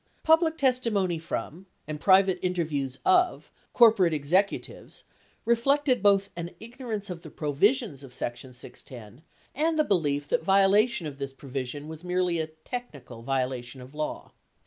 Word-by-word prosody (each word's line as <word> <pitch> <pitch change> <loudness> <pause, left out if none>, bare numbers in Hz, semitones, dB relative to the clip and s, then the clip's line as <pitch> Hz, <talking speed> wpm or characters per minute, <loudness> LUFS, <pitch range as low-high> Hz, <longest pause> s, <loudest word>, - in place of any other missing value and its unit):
Public 320 0 +4
testi 255 -3 +1
mony 185 -5 0
from, 170 +2 -5 0.2
and 150 -1 -6
private 190 -1 +4
interviews 155 -7 -2
of, 365 -1 +2 0.2
corporate 215 -9 +5
executives 180 +8 -1 0.4
reflected 255 +2 +2
both 200 0 +3
an 170 0 -5
ignorance 225 -4 -6
of 170 -2 -7
the 155 - -10
provisions 155 - +1
of 135 -3 -12
section 125 +1 -4
610 120 0 -12 0.3
and 315 +3 0
the 305 - +4
belief 145 - 0
that - - +1
violation 195 +2 +3
of 145 -2 -7
this 135 -1 -5
provision 135 +1 -6
was 160 +1 -9
merely 180 -1 0
a 160 - -2
"technical" 155 - -8
violation 130 0 -3
of 125 +2 -12
law. 150 0 -5
175 Hz, 145 wpm, -27 LUFS, 140-220 Hz, 0.4 s, corporate